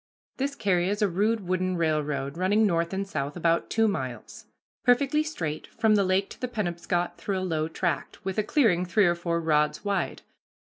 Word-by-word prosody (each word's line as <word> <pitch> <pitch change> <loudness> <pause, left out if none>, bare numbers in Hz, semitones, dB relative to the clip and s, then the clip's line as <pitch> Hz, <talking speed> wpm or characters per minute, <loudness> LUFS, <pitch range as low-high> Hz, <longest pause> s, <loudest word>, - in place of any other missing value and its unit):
This 280 +1 -2
carry 180 -3 +1
is 205 +2 0
a - - +4
rude 205 +2 0
wooden 185 0 0
railroad 150 -4 -1
running 200 +5 +3
north 170 -3 +1
and 195 +1 -2
south 145 -4 -3
about 170 0 +1
two 225 0 +3
miles, 130 - -5 0.4
perfectly 275 +5 +3
straight, 165 - -4
from 220 -2 +2
the 205 -1 +4
lake 190 +1 +1
to - - -12
the 250 - -1
Penobscot 175 -5 -2
through 195 -2 -2
a - - -2
low 160 -4 -1
tract, 175 +3 -3
with 190 +2 -1
a - - +2
clearing 215 - +3
three 195 +3 +3
or 175 - +4
four 170 -1 -2
rods 150 +1 +1
wide. 200 -3 -1
185 Hz, 190 wpm, -27 LUFS, 170-210 Hz, 0.4 s, a